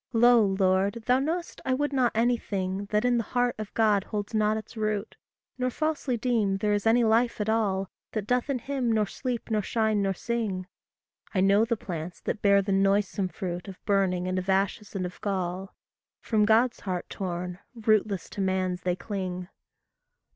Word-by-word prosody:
Lo, 240 0 +6
Lord, 195 +2 +1
thou 250 +1 +4
know'st, 335 +5 -3
I 260 - +1
would 290 +1 -1
not 255 -3 +3
anything 205 -5 0
That 210 +3 0
in 245 -1 +3
the - - 0
heart 245 0 +3
of 215 -1 -5
God 210 -3 +3
holds 205 0 -4
not 215 0 +2
its 220 - -8
root; 215 -1 -2 0.4
Nor 255 0 +1
falsely 295 -3 -1
deem 220 -5 +1
there 210 +1 +1
is 205 +1 0
any 235 +2 +5
life 230 +2 +2
at 210 - -1
all 200 -4 +1 0.3
That 215 -3 -2
doth 250 +4 0
in 275 - +1
him 255 -1 -1
nor 215 -1 +2
sleep 240 +3 -4
nor 215 -1 +2
shine 220 0 +1
nor 195 -1 0
sing; 215 -4 -2 0.7
I 185 - +3
know 200 +3 +4
the 235 0 -1
plants 175 -3 -6
that - - -3
bear 200 -1 +5
the 200 - -2
noisome 195 0 +2
fruit 180 -1 -5
Of 190 -2 -8
burning 190 -3 +1
and 185 0 0
of 185 +1 -5
ashes 195 +2 0
and 185 -2 -1
of 180 - -8
gall 190 -1 -3 0.4
From 215 -2 +2
God's 230 +3 +3
heart 185 -3 -3
torn, 180 -1 -4 0.2
rootless 215 -4 +1
to 200 - -4
man's 185 -1 0
they 180 -1 0
cling. 185 -3 -4
210 Hz, 185 wpm, -27 LUFS, 190-230 Hz, 0.7 s, Lo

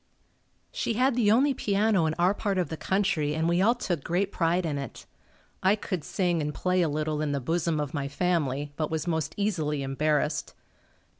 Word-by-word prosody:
She - - -1
had 255 +2 +2
the 230 -4 +3
only 270 +5 +4
piano 205 -6 +2
in 155 - -1
our 180 +3 +3
part 200 -2 -2
of 175 -5 0
the 160 - -3
country 165 -5 0
and 160 +1 0
we 170 +2 +2
all 230 +5 +4
took 175 - -3
great 190 +4 0
pride 170 +1 +1
in 145 -3 -2
it. 135 -4 -8 0.6
I 190 +2 +4
could 185 -6 -4
sing 175 -2 0
and 150 0 -3
play 180 0 +1
a 165 - +2
little 155 0 -1
in 150 -2 -1
the 140 - 0
bosom 165 +3 0
of 145 -2 -3
my 140 -2 -2
family, 145 -3 -1
but 155 -2 -1
was 160 0 -2
most 160 -3 -2
easily 155 -9 -1
embarrassed. 145 +1 0
165 Hz, 200 wpm, -27 LUFS, 150-195 Hz, 0.6 s, only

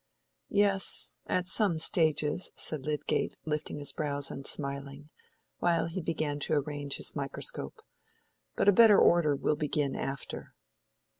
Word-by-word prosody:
"Yes, 200 -1 +1
at 180 -1 -1
some 190 -3 +4
stages," 160 0 +1
said 150 -3 -2
Lydgate, 150 -1 -1
lifting 150 -1 -3
his 145 -1 +1
brows 145 -2 -3
and 135 - -6
smiling, 140 +1 -2 0.5
while 170 -2 +1
he 170 +3 -4
began 155 -3 -2
to 145 - -1
arrange 145 -1 -2
his - - 0
microscope. 140 -2 -3 0.7
"But - - 0
a - - +9
better 220 -1 +7
order 155 -4 +4
will 150 - 0
begin 145 -2 -1
after." 135 0 -5
150 Hz, 135 wpm, -29 LUFS, 145-170 Hz, 0.7 s, a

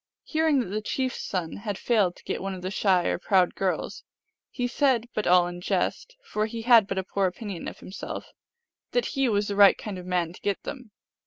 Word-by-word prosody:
Hearing 315 -4 +2
that 200 - -5
the 210 +2 -2
chief 255 +3 -1
s - - -6
son 175 -4 -3
had 205 -1 -4
failed 205 -7 +2
to - - -18
get - - -3
one 195 0 -3
of 180 - -9
the 185 - -3
shy 185 -4 +2
or - - 0
proud 185 -1 +3
girls, 190 -2 -2 0.5
he 245 - -3
said 245 -2 +2
but 215 - -1
all 180 0 +6
in 175 0 -6
jest, - - -1
for 215 - -1
he 225 0 -6
had 230 -4 +6
but 195 - -3
a 190 - 0
poor 195 +1 0
opinion 190 -1 -6
of - - -7
himself 190 - -7 0.6
that - - +2
he 270 -4 +2
was 205 -1 +1
the 200 - -2
right 200 -1 +7
kind 200 -4 -6
of 180 - -9
a - - -7
man 175 -2 0
to - - -14
get 200 -2 -1
them. 255 -5 -7
205 Hz, 235 wpm, -26 LUFS, 185-235 Hz, 0.6 s, right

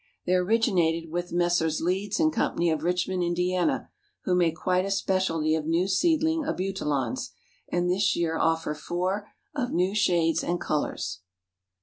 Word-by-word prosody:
They 180 - +1
originated 180 -5 +2
with 175 +1 -3
Messrs. 175 -2 +1
Leeds 190 - -1
& 315 - +2
Co., - - 0 0.2
of 165 -3 +1
Richmond, 180 +2 0
Indiana, 180 +1 0 0.3
who 185 - 0
make 170 -3 +2
quite 180 +3 +1
a 195 - -3
specialty 185 -5 +1
of 160 -1 -1
new 170 +3 +2
seedling 320 - +2
Abutilons, 195 - -2 0.4
and 175 0 +1
this 190 +2 +2
year 165 -1 0
offer 165 -1 +1
four 180 +6 -2 0.3
"of 260 -4 -2
new 180 +3 +1
shades 170 -6 +2
and 175 0 -1
colors." 90 - -2
180 Hz, 145 wpm, -27 LUFS, 165-195 Hz, 0.4 s, originated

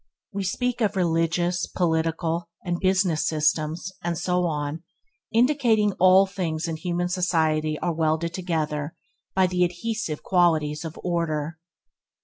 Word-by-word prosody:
We 200 0 -2
speak 245 +6 -1
of 210 -2 +1
religious, 175 0 +1
political, 165 0 -1 0.2
and 175 -1 -1
business 185 -4 +2
systems; 155 +3 0
and 170 -1 -1
so 180 +1 0
on, 150 0 -3 0.5
indicating 235 -4 +3
that - - -13
all 185 +1 +7
things 175 -4 -3
in 165 -1 -3
human 175 +2 -1
society 160 -4 +1
are 170 - +1
welded 160 +1 0
together 155 -4 -2 0.4
by 190 0 +4
the 180 0 +1
adhesive 180 -1 -2
qualities 160 -5 +2
of 160 -1 -7
order. 160 -3 -2
170 Hz, 130 wpm, -25 LUFS, 160-185 Hz, 0.5 s, all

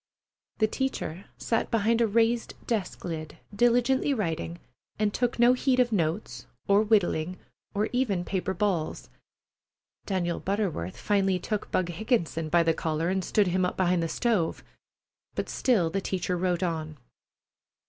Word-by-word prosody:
The 215 - +4
teacher 215 -7 -3
sat 225 - -1
behind 230 +1 +2
a 230 - +4
raised 230 +2 +1
desk 220 -5 -2
lid, 155 -3 -5 0.2
diligently 245 +5 +3
writing, 170 -5 -2 0.4
and 210 -1 +1
took 245 -1 0
no 240 +1 +6
heed 255 0 +1
of 245 -1 +3
notes, 170 0 -2 0.2
or 200 +1 +5
whittling, 185 -5 +1 0.4
or 210 +2 +1
even 210 -9 0
paper 190 0 -2
balls. 175 -5 -1 1.0
Daniel 175 -3 -1
Butterworth 190 - -2
finally 195 -2 +1
took 210 +3 -3
Bug 180 -1 0
Higginson 170 -5 -1
by 170 +1 +4
the 165 0 +3
collar 160 +1 -1
and 190 0 0
stood 200 +1 +2
him 185 +1 +1
up 180 - -1
behind 180 -2 +2
the 165 - -1
stove, 215 -8 0 0.7
but - - -3
still 195 -11 +2
the 195 - -1
teacher 185 -1 -1
wrote 180 0 0
on. 160 -3 -3
190 Hz, 150 wpm, -27 LUFS, 170-225 Hz, 1.0 s, no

